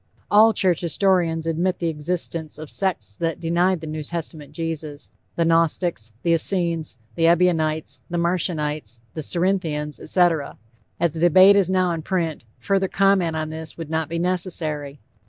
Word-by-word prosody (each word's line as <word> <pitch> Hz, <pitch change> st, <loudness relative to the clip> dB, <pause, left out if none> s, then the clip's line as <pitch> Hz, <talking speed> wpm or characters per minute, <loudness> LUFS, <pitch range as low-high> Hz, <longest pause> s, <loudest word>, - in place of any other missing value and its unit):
All 220 Hz, +2 st, +7 dB
church 185 Hz, -6 st, +1 dB
historians 170 Hz, -2 st, +1 dB
admit 170 Hz, +3 st, 0 dB
the 170 Hz, -, -2 dB
existence 160 Hz, 0 st, -3 dB
of 155 Hz, -1 st, -8 dB
sects 165 Hz, -, -2 dB
that 165 Hz, -1 st, -2 dB
denied 175 Hz, +1 st, +1 dB
the -, -, -6 dB
New 155 Hz, 0 st, -4 dB
Testament 155 Hz, -1 st, -5 dB
Jesus 155 Hz, -, -5 dB, 0.2 s
the 170 Hz, -, +1 dB
Gnostics, 165 Hz, -, +1 dB
the 170 Hz, -, +2 dB
Essenes, 165 Hz, -3 st, 0 dB, 0.2 s
the 165 Hz, -1 st, +2 dB
Ebionites, 165 Hz, -3 st, +1 dB
the 175 Hz, -, -2 dB
Marcionites, 155 Hz, -, -1 dB, 0.2 s
the 155 Hz, -, -4 dB
Cerinthians, 165 Hz, -3 st, -1 dB
etc. 165 Hz, -4 st, +1 dB, 0.4 s
As 170 Hz, -1 st, +2 dB
the 160 Hz, -, -6 dB
debate 185 Hz, +4 st, +7 dB
is 195 Hz, -3 st, +3 dB
now 185 Hz, -1 st, +2 dB
in 165 Hz, -1 st, -3 dB
print, 165 Hz, -6 st, -2 dB
further 190 Hz, +10 st, 0 dB
comment 190 Hz, -4 st, +2 dB
on 155 Hz, 0 st, -3 dB
this 160 Hz, 0 st, -7 dB
would 165 Hz, -2 st, -7 dB
not 160 Hz, -1 st, -1 dB
be 170 Hz, -, -3 dB
necessary. 165 Hz, -5 st, -2 dB
165 Hz, 155 wpm, -22 LUFS, 155-180 Hz, 0.4 s, All